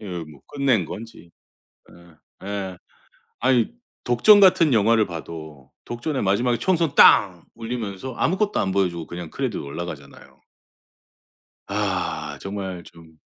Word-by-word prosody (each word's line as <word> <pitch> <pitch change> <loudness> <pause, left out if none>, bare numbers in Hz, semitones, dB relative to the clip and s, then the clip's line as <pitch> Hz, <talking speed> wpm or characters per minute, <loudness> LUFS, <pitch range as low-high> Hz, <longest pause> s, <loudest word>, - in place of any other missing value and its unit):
예 105 - -9
뭐 80 -6 -8
끝낸 135 - +1
건지 100 -1 -10 1.2
예예. 95 -3 -5 0.6
아니 125 - +2 0.3
독전 125 - +6
같은 170 -7 +5
영화를 110 0 +3
봐도 80 -5 -9
독전의 130 +4 -3
마지막에 120 +5 +1
총성 170 -6 0
땅 90 -4 +6
울리면서 115 0 -5
아무것도 205 +4 0
안 95 - 0
보여주고 90 -4 -1
그냥 85 -2 -7
크레디트 - - -3
올라가잖아요. 75 -1 -8 1.3
아 - - -3
정말 95 -3 -5
좀. 80 -2 -17
100 Hz, 260 characters per minute, -23 LUFS, 85-125 Hz, 1.3 s, 독전